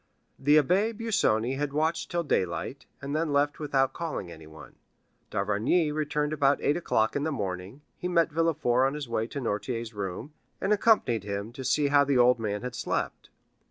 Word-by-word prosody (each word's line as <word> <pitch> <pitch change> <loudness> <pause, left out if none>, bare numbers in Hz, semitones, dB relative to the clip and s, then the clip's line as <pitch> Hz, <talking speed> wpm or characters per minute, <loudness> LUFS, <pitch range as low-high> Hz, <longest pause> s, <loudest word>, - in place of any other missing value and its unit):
The 145 +3 +5
Abbé 195 - +2
Busoni 135 - +1
had 145 0 -2
watched 160 +2 0
till 175 0 -1
daylight, 95 - -2 0.2
and 140 +1 -3
then 155 -1 0
left 145 +1 +1
without 135 -3 +1
calling 155 - -4
anyone. 80 -3 -13 0.5
D'Avrigny 105 - +1
returned 150 0 -1
about 140 -1 +3
eight 145 - +1
o'clock 110 -10 0
in 145 - 0
the 160 +2 -1
morning; 100 +2 -5 0.2
he 180 - -2
met 170 -3 +2
Villefort 150 -6 +2
on 135 - -3
his 150 -3 -5
way 115 -1 -1
to 140 - -5
Noirtier's 115 0 -3
room, 105 - -5 0.3
and 195 +2 +2
accompanied 200 - +3
him 100 +2 -4
to 135 +1 -7
see 145 +2 +2
how 145 0 +5
the 140 -2 +1
old 125 0 +5
man 105 0 -3
had 125 -1 -4
slept. - - -3
140 Hz, 180 wpm, -28 LUFS, 110-155 Hz, 0.5 s, The